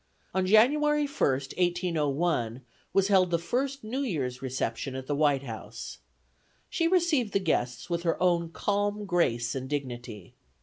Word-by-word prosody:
On 185 0 +1
January 295 +8 +4
1st, 135 - -1
1801, 160 -8 0 0.3
was 195 0 +2
held 185 -3 +4
the 170 - +2
first 260 +10 -2
New 230 +5 -3
Year's 140 - -2
reception 130 0 -3
at 130 0 -5
the 145 - -2
White 145 -2 +2
House. 115 -4 -8 0.7
She 330 - +1
received 330 - +2
the 195 - +3
guests 125 -8 -1
with 170 -1 -1
her 170 -1 0
own 175 -2 +2
calm 205 +3 -1
grace 120 -11 +1
and 130 -1 -5
dignity. 120 -8 -5
170 Hz, 145 wpm, -28 LUFS, 130-205 Hz, 0.7 s, January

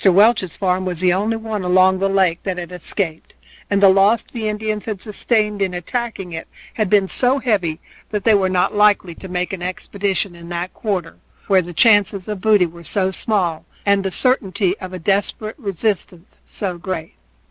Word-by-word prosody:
Welch's 195 -1 +4
farm 185 -1 0
was 180 -3 -3
the 180 0 +3
only 215 +4 0
one 220 -2 -4
along 185 +1 +3
the 195 0 +1
lake 190 -3 +2
that 190 -2 -3
had 175 0 -6
escaped, 180 -2 -3 0.3
and 200 0 +1
the 195 - +9
loss 200 +4 +4
the 225 -3 -5
Indians 215 0 -3
had 215 -3 -3
sustained 210 0 0
in 185 -2 0
attacking 195 -1 -4
it 160 - -6 0.3
had 215 -4 -1
been 200 -1 +4
so 255 +6 +2
heavy 195 - 0 0.3
that 210 -2 -3
they 225 - +5
were 195 -2 +3
not 180 -1 +1
likely 205 -4 +3
to 190 - -10
make 180 0 -3
an 185 - -5
expedition 195 +1 -2
in 170 0 -12
that 175 +1 -4
quarter, 185 -6 -3 0.3
where 195 -2 +4
the 175 0 -8
chances 200 0 +3
of 210 -3 -4
booty 210 -3 +4
were 170 0 -10
so 190 +3 0
small 185 -5 0 0.2
and 200 -1 +3
the 190 - -1
certainty 195 -5 +1
of 185 - -7
a 185 - -5
desperate 200 - -1
resistance 195 - -3
so 185 -4 -5
great. 170 -3 -5
195 Hz, 190 wpm, -19 LUFS, 180-210 Hz, 0.3 s, the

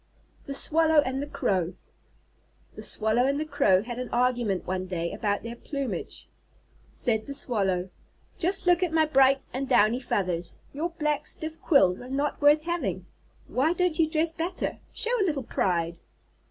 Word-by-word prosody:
_ - - -30
THE 275 - -4
SWALLOW 315 0 +3
AND 265 +1 -2
THE 285 - -4
CROW 190 - -1 1.0
The - - -8
Swallow 220 +4 +1
and 280 +1 0
the 310 - -2
Crow 190 -10 +3
had 240 +1 -6
an 250 - -4
argument 240 -6 0
one 185 0 -3
day 170 -2 -3
about 205 -1 -1
their 235 +1 -6
plumage. 275 +1 -5 0.6
Said 220 -3 0
the 280 - -3
Swallow: 190 -8 -1 0.5
"Just 370 +2 +2
look 355 0 +4
at 360 -3 +1
my 320 -1 +3
bright 270 -2 +4
and 265 +1 -3
downy 240 -1 +4
feathers. 180 -8 -2 0.2
Your 315 +5 -2
black 300 -4 -1
stiff 315 +1 -5
quills 190 - +4
are 250 - -9
not 280 +3 -2
worth 295 +1 +5
having. 345 0 -2 0.4
Why 300 +6 +1
don't 360 -2 0
you 320 -1 +3
dress 315 +1 +1
better? 335 +3 -2
Show 475 +2 -1
a - - +4
little 300 -8 -1
pride!" 170 -6 -1
270 Hz, 170 wpm, -27 LUFS, 210-315 Hz, 1.0 s, worth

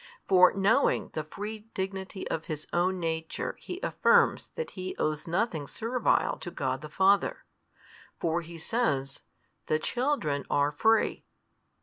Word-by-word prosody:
For 185 -1 +7
knowing 200 +8 +2
the 155 - -2
free 210 +7 -7
dignity 190 0 -4
of 160 - -3
His 155 -1 -5
Own 180 +2 +1
Nature 160 -1 -3
He 360 - -6
affirms - - +3
that 475 - -4
He 185 -1 -5
owes 155 +1 -1
nothing 170 -4 -1
servile 230 - +1
to 175 - -5
God 135 -6 -2
the 150 - -8
Father: 195 +5 +2 0.7
for 170 +1 0
He 170 0 -10
says, 145 - -1 0.5
The 155 - +2
children 170 - -1
are 145 0 +2
free. 220 +9 +2
180 Hz, 135 wpm, -29 LUFS, 155-210 Hz, 0.7 s, For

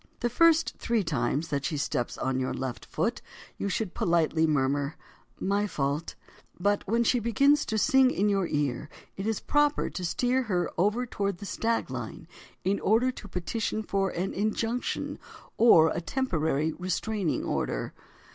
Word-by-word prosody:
The 240 0 0
first 330 +4 +4
three 230 -3 +1
times 155 0 -1
that 140 -1 -1
she 150 - -1
steps 130 -4 -2
on 130 0 -1
your 130 - -2
left 130 -2 -5
foot, - - -1 0.4
you 200 - -1
should 195 -1 -2
politely 165 -1 +2
murmur, 140 0 0 0.4
"My 200 +2 +1
fault." 145 -2 -2 0.4
But 205 +2 +2
when 230 +4 +2
she 245 +2 +2
begins 275 +6 +3
to 220 - -1
sing 265 +4 +5
in 205 -4 +1
your 195 -3 +1
ear 145 -2 -1 0.3
it 195 +2 -4
is 220 -2 0
proper 295 0 +1
to 185 - -5
steer 250 +9 +1
her 180 -8 -1
over 210 +8 +1
toward 200 -5 -2
the 200 - -8
"stag 230 +3 -1
line" - - -6 0.4
in 195 +2 +1
order 235 +5 +3
to 230 - -11
petition 215 +4 -2
for 195 -2 0
an 185 +3 -3
injunction 225 +4 -2 0.4
or 165 -9 +7
a - - -2
temporary 160 - 0
restraining 185 - -2
order. - - -2
195 Hz, 160 wpm, -28 LUFS, 160-230 Hz, 0.4 s, or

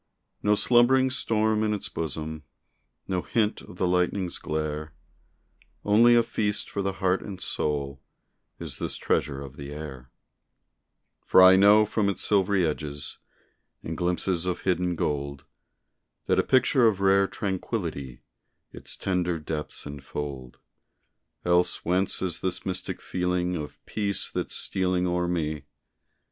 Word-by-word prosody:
No 105 0 +3
slumbering 130 +4 +4
storm 110 -3 +1
in 105 -1 +1
its 100 - -5
bosom, 80 0 -5 0.7
No 90 -1 -1
hint 110 +1 0
of 90 - -13
the 90 - +1
lightning's 90 +1 0
glare, 75 0 -3 0.9
Only 115 +4 +6
a 120 - +5
feast 105 -2 -2
for 100 - -2
the 95 0 -1
heart 95 -1 +1
and 95 -3 -7
soul 70 -5 -2 0.6
Is - - -7
this - - -3
treasure 70 -2 -1
of 70 0 -11
the 70 0 -7
air; 70 -4 -8 1.1
For - - +5
I 95 0 +9
know 105 +2 +6
from 105 -1 0
its 95 - -2
silvery 100 -2 +3
edges, 75 -2 -4 0.6
And 80 - -4
glimpses 90 0 -1
of 90 - -2
hidden 90 -1 0
gold, 70 -3 -3 0.8
That - - +2
a - - +4
picture 130 -1 +4
of 105 -4 +1
rare 100 0 +4
tranquility 85 - -4 0.5
Its - - -6
tender 90 -2 0
depths 75 0 -5
enfold. 70 -2 -6 0.9
Else 90 0 +2
whence 90 +3 +1
is 90 -3 -2
this 95 -1 -2
mystic 90 -1 -4
feeling 90 0 -1
Of 75 -3 -7
peace 100 -2 -2
that's - - -3
stealing 90 -1 0
o'er 90 0 0
me? 80 -4 -2
90 Hz, 135 wpm, -26 LUFS, 75-100 Hz, 1.1 s, I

